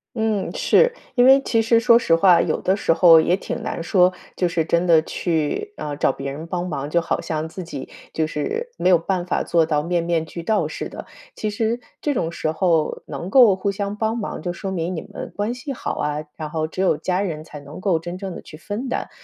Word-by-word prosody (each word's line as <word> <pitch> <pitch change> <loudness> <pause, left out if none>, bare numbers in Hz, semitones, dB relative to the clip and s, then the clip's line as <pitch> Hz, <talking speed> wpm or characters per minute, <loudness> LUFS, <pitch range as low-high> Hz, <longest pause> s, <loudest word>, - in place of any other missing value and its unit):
嗯， 220 -3 -1
是。 - - +3 0.2
因 245 - +5
为 270 +1 +7
其 230 -4 0
实 230 +1 +4
说 235 0 +6
实 170 -8 +3
话， 175 0 +5
有 - - 0
的 190 - +2
时 165 - +2
候 165 -1 +7
也 170 +3 +3
挺 195 - -5
难 - - -4
说， 180 +1 +3 0.2
就 180 - +2
是 170 -1 0
真 170 +2 +1
的 165 -3 +5
去， 165 - -2
嗯， 145 -1 -5
找 - - +2
别 135 +1 -5
人 150 +4 -7
帮 175 +1 -3
忙， 140 -5 -3
就 170 +3 +1
好 - - -1
像 155 0 -3
自 185 +3 -7
己 145 -6 -7 0.2
就 160 -1 0
是 455 - -3
没 - - +2
有 180 - +7
办 180 +1 -2
法 180 - 0
做 165 -2 +2
到 150 -2 +1
面 170 +2 -1
面 170 -1 0
俱 170 +1 -8
到 215 +4 +1
似 - - -5
的。 - - -9 0.3
其 215 - -3
实 225 +3 -1 0.2
这 295 - -1
种 165 -10 -1
时 160 -2 -2
候 160 -1 +1
能 175 - -6
够 240 -7 +7
互 200 +1 -1
相 200 +1 -3
帮 220 +1 0
忙， 225 -4 -4
就 175 - -2
说 190 +2 -5
明 180 -1 -2
你 160 - -4
们 - - -8
关 210 +3 -1
系 275 +2 -6
好 - - -4
啊， 150 +1 -2
然 155 -1 -6
后 155 0 -1
只 165 - -10
有 190 -4 +3
家 185 +3 -1
人 160 -6 -3
才 155 -2 -10
能 145 +5 -11
够 185 -4 +2
真 175 +2 -6
正 190 -2 -5
地 - - -8
去 - - -12
分 205 - -5
担。 - - -3
175 Hz, 260 characters per minute, -22 LUFS, 160-205 Hz, 0.3 s, 为